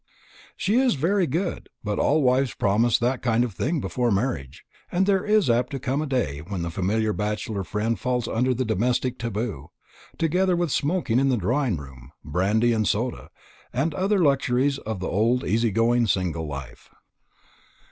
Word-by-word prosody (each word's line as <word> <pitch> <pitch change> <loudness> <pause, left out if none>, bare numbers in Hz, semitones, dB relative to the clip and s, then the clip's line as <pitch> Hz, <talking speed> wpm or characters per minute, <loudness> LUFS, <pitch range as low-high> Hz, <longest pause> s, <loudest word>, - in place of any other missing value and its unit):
"She 205 +5 +1
is 260 -7 +3
very 175 +6 +1
good; 170 +8 -3
but 105 -1 -2
all 150 0 +3
wives 130 -1 +2
promise 110 +3 +2
that 125 +2 0
kind 120 -1 +2
of 120 -5 -3
thing 155 - -1
before 125 -2 -1
marriage. 95 - -2 0.3
And 185 +2 +2
there 195 -2 +2
is 210 -4 +3
apt 120 +1 +2
to 135 - -2
come 135 +3 -1
a 155 - -3
day 125 - -1
when 85 +3 -5
the 85 - -3
familiar 105 +4 0
bachelor 105 -1 -2
friend 105 +4 -2
falls 125 -2 -1
under 125 +3 +1
the 130 +2 -1
domestic 120 +4 0
taboo, 110 - -4 0.5
together 180 +3 +2
with 175 -3 0
smoking 145 -6 +1
in 135 0 +2
the 125 - +2
drawing 120 - 0
room, 65 -2 -12
brandy 105 +9 +2
and 110 -2 +1
soda, 120 +4 -2 0.4
and 145 +6 0
other 195 +7 +1
luxuries 140 -3 +2
of 110 -4 -5
the 95 - -2
old, 115 +6 +1
easy 115 +4 +1
going, 115 +2 +2
single 85 -4 -1
life." 70 -3 -8
120 Hz, 175 wpm, -24 LUFS, 105-140 Hz, 0.5 s, is